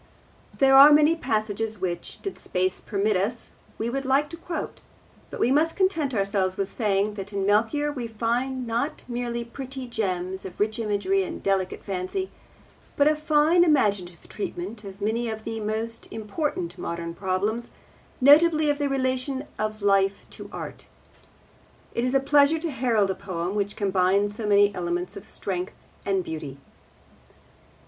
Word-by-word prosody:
There 270 -1 +5
are 280 +2 +10
many 300 +2 +6
passages 220 -5 -2
which, 175 -2 -5
did 390 - -5
space 185 0 -1
permit 205 0 0
us, 215 +6 -2 0.3
we 225 - -2
would 270 +3 -2
like 275 +3 +2
to - - -5
quote, 335 +1 -6 0.5
but - - -8
we 245 - +3
must 315 +4 +2
content 325 -9 +1
ourselves 195 -2 0
with 195 0 -1
saying 210 -2 +1
that 200 0 -7
in 195 -1 -1
Melchior 230 +9 +2
we 250 -5 -4
find 240 +4 -1
not 240 +6 -2
merely 240 -1 -3
pretty 265 +2 -7
gems 190 -5 -2
of 185 -1 -9
rich 215 +2 0
imagery 200 -3 +1
and 185 - -5
delicate 190 -2 0
fancy, 195 - -3 0.7
but 285 - +5
a 305 - +4
fine 305 +3 +4
imaginative 205 - +1
treatment 210 +2 -5
of 195 0 -10
many 225 +3 0
of 220 0 -5
the 225 0 -4
most 220 +2 -4
important 300 - -3
modern 170 0 -4
problems, 200 +6 -2 0.5
notably 305 +2 +6
of 290 - -3
the 285 -1 0
relation 260 +1 -1
of 215 -1 -3
life 195 -1 +2
to - - -10
art. - - -8 1.1
It 235 - -1
is 255 +2 0
a - - +6
pleasure 285 +3 +4
to 325 0 -3
herald 230 -7 +1
a - - 0
poem 185 -2 -4
which 205 -1 -1
combines 200 +1 +1
so 220 -1 -4
many 205 0 +5
elements 175 0 -3
of - - -9
strength 185 -2 -4 0.3
and 195 -2 +1
beauty. 155 -5 -6
220 Hz, 160 wpm, -25 LUFS, 195-270 Hz, 1.1 s, are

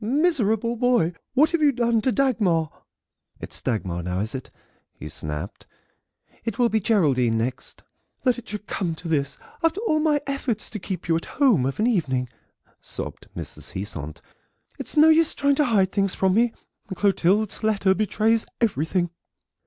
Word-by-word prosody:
"Miserable 235 - +1
boy, 240 -9 +2 0.2
what 305 +4 +5
have 335 -2 0
you 295 -2 +5
done 235 -3 +1
to 255 - +1
Dagmar?" 205 - +1 0.7
"It's - - -4
Dagmar 95 -8 -2
now, 90 +1 -2
is 110 +3 -3
it?" 130 -1 -6 0.5
he - - -8
snapped; 75 +5 -6 0.8
"it 230 - -3
will 240 -2 +3
be 220 - +2
Geraldine 140 - +2
next." 125 +3 -4 0.4
"That 250 -2 +2
it 240 - -13
should 210 0 -6
come 175 -6 -2
to 170 - -8
this, 145 -4 -1 0.2
after 330 +4 +1
all 310 -9 +1
my 305 -1 +2
efforts 275 -6 -3
to 215 - -5
keep 180 -2 -5
you 165 - +3
at 165 - -2
home 235 - +4
of 135 - -4
an 215 - +2
evening," 135 - 0 0.5
sobbed - - -6
Mrs. - - -7
Heasant; 80 -6 -6 0.6
"it's - - -6
no 310 +1 +8
use 320 0 +4
you - - -23
trying 280 0 +3
to 295 - +3
hide 200 -6 +2
things 195 -2 0
from 190 -1 +2
me; 235 +3 +3 0.4
Clotilde's 200 +2 +1
letter 205 -3 +2
betrays 215 +2 +1
everything." 175 - 0
210 Hz, 170 wpm, -24 LUFS, 160-245 Hz, 0.8 s, no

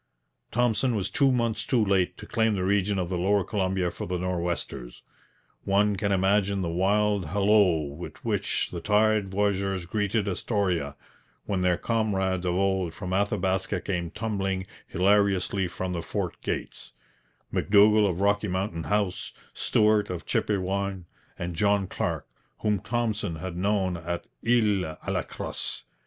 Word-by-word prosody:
Thompson 120 +1 +1
was 100 -2 -2
two 135 -2 +3
months 115 -3 0
too 120 -4 +2
late 95 -2 +1
to - - -9
claim 110 -2 +1
the 95 - -1
region 100 +1 +1
of 90 -2 -1
the 90 -2 -1
lower 100 +2 +2
Columbia 95 -2 -1
for - - -6
the 90 0 -1
Nor'westers. 85 -8 -3 0.6
One 100 +1 +2
can 100 +1 -1
imagine 100 0 +2
the 85 - -1
wild 100 +1 +1
halloo 95 -6 +3
with 85 +4 -8
which - - 0
the 85 - -5
tired 105 0 +2
voyageurs 95 -2 0
greeted 105 +2 0
Astoria 90 -7 -1 0.5
when 95 -3 -1
their 90 -1 +2
comrades 95 -5 0
of 90 - +1
old 95 -3 0
from 95 -2 -5
Athabaska 95 -1 0
came 85 -3 -3
tumbling 95 -3 -2 0.2
hilariously 100 0 +2
from 90 +1 -4
the 85 - -2
fort - - -4
gates - - -5 0.6
M'Dougall 105 0 +5
of 90 +1 -3
Rocky 105 +1 +2
Mountain 95 -3 -2
House, 100 +2 -1 0.2
Stuart 105 -1 +2
of 90 -2 -5
Chipewyan, 100 -2 -1 0.3
and 85 -1 -4
John 100 +2 +2
Clarke, - - -3 0.3
whom 105 -2 +1
Thompson 110 -5 -2
had 90 +2 -6
known 95 -1 0
at 85 +1 -4 0.2
Isle 105 -9 +2
à - - -8
la - - +1
Crosse. - - -6
95 Hz, 145 wpm, -27 LUFS, 90-105 Hz, 0.6 s, M'Dougall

